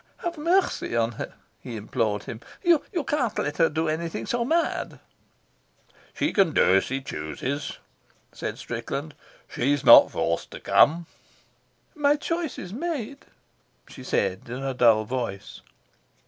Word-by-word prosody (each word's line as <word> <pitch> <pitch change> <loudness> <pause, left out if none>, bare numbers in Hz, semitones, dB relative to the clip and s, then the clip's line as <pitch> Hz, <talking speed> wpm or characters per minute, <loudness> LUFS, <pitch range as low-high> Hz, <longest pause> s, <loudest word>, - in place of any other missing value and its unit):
"Have 345 -1 -2
mercy 340 - +1
on 115 0 +1
her," 115 - -7 0.2
he 120 - -8
implored 110 -1 -1
him. 115 - -8 0.2
"You 345 -4 +5 0.3
can't 265 -7 0
let 145 0 -2
her 165 -1 +4
do 160 +1 -1
anything 165 +2 -3
so 240 -2 -1
mad." 330 +7 -1 1.2
"She 305 - 0
can 185 -6 +3
do 95 - +4
as 95 - +1
she 135 +1 -3
chooses," 135 - -4 0.5
said - - -5
Strickland. - - -5 0.3
"She's 140 +3 0
not - - +9
forced 85 0 -2
to - - -7
come." 165 +3 +4 0.9
"My 295 -3 +3
choice 330 0 -3
is 185 0 -7
made," 280 -2 -4 0.6
she 130 - -11
said, 100 -3 -1
in 125 +3 -5
a 135 -1 -2
dull 115 -3 +4
voice. 115 -5 -5
150 Hz, 140 wpm, -25 LUFS, -, 1.2 s, not